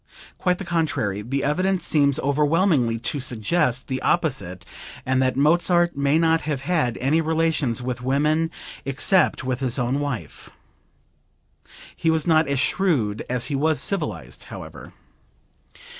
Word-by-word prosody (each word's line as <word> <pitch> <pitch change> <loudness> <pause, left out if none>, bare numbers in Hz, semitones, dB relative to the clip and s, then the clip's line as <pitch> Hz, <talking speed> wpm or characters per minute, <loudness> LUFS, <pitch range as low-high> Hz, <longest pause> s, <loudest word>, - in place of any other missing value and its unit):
Quite 180 -1 +1
the 195 - -7
contrary, 145 - -1
the 135 +6 -2
evidence 185 +6 0
seems 140 -3 +2
overwhelmingly 145 -3 +2
to 140 +5 -2
suggest 125 +2 0
the 130 -1 -3
opposite, 125 - -1 0.4
and 130 0 +1
that 130 -1 +1
Mozart 175 +3 +3
may 140 +2 +2
not 165 0 +3
have 150 -3 -3
had 145 -6 0
any 145 +6 +1
relations 160 -7 0
with 125 -1 -4
women 150 +5 +1 0.3
except 140 +7 +2
with 130 -1 -2
his 130 -3 -1
own 130 +2 0
wife. 140 -5 -5 1.5
He 165 - 0
was 160 -1 +1
not 160 -2 +3
as 140 -1 0
shrewd 130 - 0
as 125 -1 -1
he 145 - -2
was 155 +2 +1
civilized, 200 - -3
however. - - -10
145 Hz, 140 wpm, -23 LUFS, 130-165 Hz, 1.5 s, Mozart